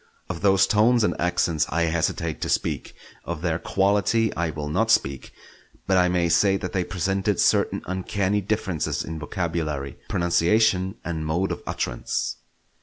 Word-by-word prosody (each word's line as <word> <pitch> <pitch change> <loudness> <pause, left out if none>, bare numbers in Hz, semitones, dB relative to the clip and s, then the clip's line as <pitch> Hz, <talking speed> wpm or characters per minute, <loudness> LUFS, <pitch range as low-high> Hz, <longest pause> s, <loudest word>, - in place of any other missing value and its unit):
Of 85 -2 -5
those 95 -1 +4
tones 115 +2 +3
and - - +2
accents 85 -3 +1
I 85 +1 +1
hesitate 85 -1 -1
to - - -2
speak; - - -1 0.3
of 85 -1 -5
their 85 -2 0
quality 105 +4 +1
I 85 -1 -1
will 75 -1 -5
not 75 - 0
speak; 70 -1 +1 0.5
but 95 - +2
I 90 -1 +4
may 90 -1 +1
say 95 +4 +3
that 110 - -6
they 95 -2 +1
presented 95 +2 -1
certain - - +2
uncanny 95 +2 -1
differences 95 -5 -2
in 80 0 -6
vocabulary, 75 -4 -3
pronunciation, 95 +3 +2
and 80 -2 -3
mode 85 +5 -1
of - - -4
utterance. - - -2
90 Hz, 155 wpm, -24 LUFS, 80-95 Hz, 0.5 s, those